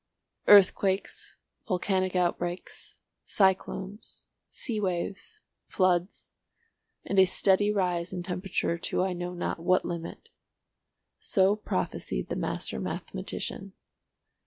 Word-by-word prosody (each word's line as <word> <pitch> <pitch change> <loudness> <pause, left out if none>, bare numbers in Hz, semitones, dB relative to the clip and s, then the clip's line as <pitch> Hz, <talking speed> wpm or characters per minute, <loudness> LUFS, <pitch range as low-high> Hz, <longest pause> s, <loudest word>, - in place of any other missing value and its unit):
"Earthquakes, 195 -1 +4 0.3
volcanic 185 -1 0
outbreaks, 175 0 -2 0.3
cyclones, 190 +1 -1 0.2
sea 230 -5 -4
waves, 195 - -3 0.2
floods, 185 0 0 0.7
and 195 - +1
a 190 - +8
steady 195 +2 +3
rise 180 -4 0
in 180 -2 -4
temperature 180 -1 -2
to 180 - 0
I 190 -1 0
know 175 0 -5
not 175 - -3
what 180 +2 +2
limit"—so 185 +3 -3
prophesied 90 - -3
the - - -2
master - - -3
mathematician. 60 - -5
185 Hz, 95 wpm, -28 LUFS, 175-195 Hz, 0.7 s, a